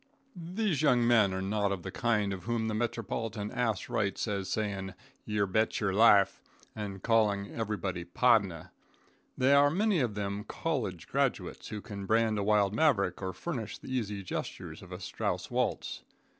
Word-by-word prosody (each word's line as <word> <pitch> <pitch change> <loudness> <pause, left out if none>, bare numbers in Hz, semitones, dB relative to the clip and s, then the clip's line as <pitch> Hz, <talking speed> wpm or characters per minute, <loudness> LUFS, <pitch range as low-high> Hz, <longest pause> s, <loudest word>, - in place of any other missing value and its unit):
These 180 - -1
young 125 -6 +4
men 110 -5 +5
are 95 0 -2
not 100 0 0
of 95 -3 -3
the 95 - -5
kind 105 -2 +1
of 95 - -7
whom 115 -1 0
the 110 - -1
metropolitan 115 -1 -3
ass 120 -5 -1
writes 100 +1 -1
as 100 -3 -2
saying 100 -3 -2 0.3
"youbetcherlife," 105 0 +3 0.3
and 100 -3 -6
calling 105 -3 +2
everybody 100 -5 -3
"pardner." 95 -3 +2 0.7
They 130 +2 +4
are 140 0 +6
many 200 +3 +2
of 120 -6 0
them 100 0 -3
college 110 - -3
graduates, - - -1
who 105 - -5
can 100 -4 -7
brand 110 -1 +2
a - - 0
wild 105 -1 +3
Maverick 105 - +2
or 95 -1 -2
furnish 110 - -5
the 130 - -8
easy 105 -5 -2
gestures 90 - -5
for - - -13
a - - -6
Strauss - - -3
waltz. - - -1
105 Hz, 155 wpm, -30 LUFS, 100-120 Hz, 0.7 s, are